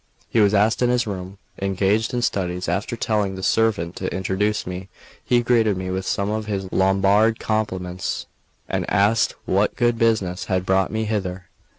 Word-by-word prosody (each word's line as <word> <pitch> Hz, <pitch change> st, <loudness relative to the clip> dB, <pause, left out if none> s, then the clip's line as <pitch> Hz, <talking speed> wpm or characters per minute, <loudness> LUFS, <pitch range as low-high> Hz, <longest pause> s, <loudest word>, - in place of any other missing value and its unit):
He 115 Hz, -, +1 dB
was 105 Hz, -2 st, +5 dB, 0.3 s
in 125 Hz, -, +3 dB
his 125 Hz, -1 st, +2 dB
room, 95 Hz, -1 st, -6 dB, 0.2 s
engaged 100 Hz, +3 st, +1 dB
in 120 Hz, -1 st, -1 dB
studies; 90 Hz, -3 st, -1 dB
after 95 Hz, +7 st, -1 dB
telling 105 Hz, -4 st, 0 dB
the 95 Hz, -, -7 dB
servant 100 Hz, -7 st, +1 dB
to 95 Hz, -, -3 dB
introduce 95 Hz, +3 st, -1 dB
me, 90 Hz, +1 st, -6 dB, 0.3 s
he 120 Hz, -1 st, +2 dB
greeted 115 Hz, -5 st, +2 dB
me 95 Hz, 0 st, -4 dB
with 95 Hz, 0 st, -3 dB
some 100 Hz, +1 st, 0 dB
of 110 Hz, 0 st, -3 dB
his 95 Hz, -3 st, -3 dB
Lombard 100 Hz, +4 st, +3 dB
compliments, 95 Hz, -4 st, -2 dB, 0.4 s
and -, -, -2 dB
asked 105 Hz, +3 st, +2 dB
what 100 Hz, +2 st, +1 dB
good 120 Hz, -1 st, +1 dB
business 100 Hz, -5 st, +1 dB
had 95 Hz, -1 st, -1 dB
brought 95 Hz, 0 st, +2 dB
me 110 Hz, 0 st, -1 dB
hither. 95 Hz, -4 st, -3 dB
100 Hz, 170 wpm, -22 LUFS, 95-110 Hz, 0.4 s, was